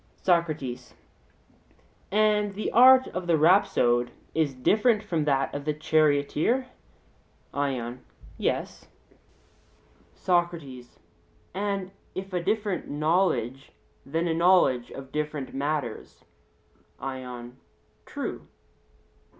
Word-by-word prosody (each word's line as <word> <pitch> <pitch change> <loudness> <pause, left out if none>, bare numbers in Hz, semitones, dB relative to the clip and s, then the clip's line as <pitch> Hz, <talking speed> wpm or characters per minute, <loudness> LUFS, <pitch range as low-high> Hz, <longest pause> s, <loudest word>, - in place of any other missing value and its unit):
SOCRATES: 155 -9 -1 1.2
And 210 -1 +2
the 215 - -3
art 260 +2 +7
of 180 -1 -5
the 165 -2 +3
rhapsode 135 -8 +3 0.2
is 155 -4 0
different 215 - +2
from 165 -7 -1
that 135 -2 +1
of 145 - -4
the 150 0 -1
charioteer? 155 - +2 0.9
ION: 130 -3 -3 0.3
Yes. - - -3 1.3
SOCRATES: 165 -9 -2 0.6
And 195 0 -2 0.2
if 190 0 -6
a 180 - 0
different 205 0 -1
knowledge, 150 -4 0 0.3
then 165 +5 -2
a 165 - +1
knowledge 165 -8 +3
of 135 -1 -10
different 150 -2 -4
matters? 145 +2 -4 0.7
ION: 125 -2 -7 0.5
True. - - -5
155 Hz, 95 wpm, -26 LUFS, 135-185 Hz, 1.3 s, art